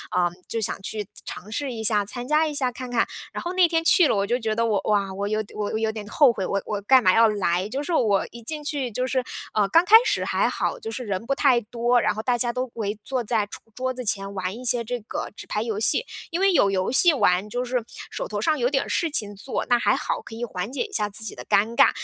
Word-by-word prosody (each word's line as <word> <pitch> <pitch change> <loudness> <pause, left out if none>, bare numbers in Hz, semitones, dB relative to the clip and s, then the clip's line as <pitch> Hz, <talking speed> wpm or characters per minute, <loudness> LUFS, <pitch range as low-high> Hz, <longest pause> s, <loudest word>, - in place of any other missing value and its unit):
呃， 175 -1 +3 0.2
就 230 - -3
想 210 - -2
去 210 0 -4 0.2
尝 205 +4 -8
试 270 +3 -3
一 225 -2 -5
下、 210 -2 +3
参 245 +3 -5
加 305 +1 +3
一 300 - -4
下 260 -3 0
看 250 +1 -8
看。 235 - +1 0.3
然 - - -4
后 350 +1 -3
那 370 -2 +5
天 330 -1 0
去 335 0 +6
了， - - +1
我 200 0 +1
就 240 +2 +1
觉 220 -2 -1
得 230 - +1
我 210 -4 +1
哇， 200 -2 +1
我 200 +1 -3
有 215 +1 -1
我 210 +1 -2
有 220 0 0
点 215 -2 -8
后 260 +4 +4
悔， 190 -4 -3
我 200 - -1
我 205 -1 -3
干 260 +5 +5
嘛 185 0 +5
要 225 0 +6
来。 190 -2 0
就 270 +5 -3
是 340 - -3
我 210 -10 +2
一 235 - -11
进 300 +5 -6
去 285 -5 -2
就 250 +4 -2
是， 260 -1 0 0.3
呃， 210 -2 +2
刚 330 - +5
开 435 - +7
始 - - +1
还 - - +1
好， - - -2
就 450 -1 -6
是 255 - -5
人 200 +1 -3
不 275 - 0
太 265 -4 +4
多， 240 +2 +1
然 - - +1
后 215 - -4
大 245 +1 0
家 240 0 +1
都 255 +1 -3
围 210 -2 -3
坐 255 0 -2
在 215 -1 0
桌 205 - -11
桌 255 0 -2
子 250 - -6
前 195 -1 0
玩 185 0 -3
一 250 - -9
些 240 -1 +3
这 245 +2 -4
个， 215 - -5
纸 - - -9
牌 210 - -2
游 220 -2 -3
戏。 460 - +4 0.3
因 340 - -1
为 390 0 +4
有 200 - +4
游 185 +2 0
戏 330 +6 +5
玩， 190 -6 +2
就 245 +3 -2
是 250 -1 -1 0.3
手 - - -5
头 205 -1 -4
上 310 +7 +2
有 245 - +2
点 270 -1 0
事 335 - 0
情 205 -7 -1
做， 225 +7 -4
那 245 - +5
还 - - +2
好 - - -3
可 225 - -11
以 235 - -5
缓 200 +2 -5
解 285 - -1
一 435 - -10
下 210 - +2
自 205 +2 -1
己 - - -6
的 - - -9
尴 215 +4 +2
尬。 - - +6
230 Hz, 300 characters per minute, -24 LUFS, 205-260 Hz, 0.3 s, 开